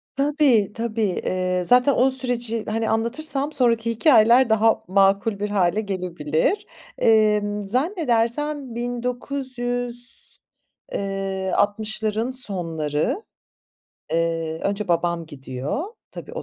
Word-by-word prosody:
Tabii, 275 -7 +2
tabii. 230 -1 -3 0.2
Eee, 185 0 -1
zaten 250 +6 +5
o 260 +2 +3
süreci, 245 -4 +2
hani, 220 +1 -1
anlatırsam 270 +6 -1
sonraki 230 -4 +2
hikâyeler 235 0 +5
daha 220 0 +2
makul 195 +2 +2
bir 210 - -2
hâle 200 0 +1
gelebilir. 180 - -2 0.3
Emm, 210 -2 +2
zannedersem 270 - -1
1900 245 0 -1 0.7
eee, 195 -1 -3
60'ların 215 +3 0
sonları, 170 - +1 0.9
eee, 165 -1 -1
önce 200 0 -2
babam 170 -1 0
gidiyor. 135 - -5 0.3
Tabii - - -10
o - - -5
220 Hz, 100 wpm, -22 LUFS, 195-245 Hz, 0.9 s, zaten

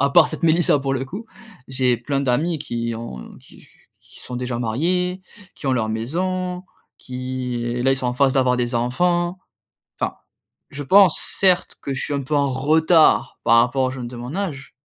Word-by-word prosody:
à 140 +1 +2
part 170 +3 +6
cette - - -7
Mélissa, 165 -2 +3
pour 135 0 -2
le 135 0 -1
coup, 195 +11 -7 0.4
j'ai 130 -2 +1
plein 135 +4 -2
d'amis 145 +6 0
qui 115 -3 -3
ont 110 - -8
qui - - -18
qu - - -20 0.3
qui - - -17
sont 125 - -7
déjà 125 -1 -3
mariés, 180 +11 -1 0.3
qui - - -8
ont 135 - +2
leur 115 -4 0
maison, 180 +11 -2 0.4
qui 125 0 -5
et 120 +1 -2
là 135 +1 +3
ils - - 0
sont 130 - -3
en 125 - 0
phase 135 +1 +2
d'avoir 130 -2 +3
des 120 0 -1
enfants. 175 +9 0 0.6
Enfin, - - -2 0.5
je 145 +1 -6
pense, 190 +3 +6 0.2
certes, 185 -2 +3
que 140 - -4
je 130 - -3
suis - - -2
un 140 -1 -2
peu 150 +3 -2
en 140 -1 +2
retard, 155 +5 +3
par 115 - +5
rapport 125 +3 +2
aux 130 - 0
jeunes 130 -2 -6
de 125 - -9
mon 120 +3 -7
âge. 155 -10 -4
135 Hz, 200 wpm, -21 LUFS, 125-165 Hz, 0.6 s, part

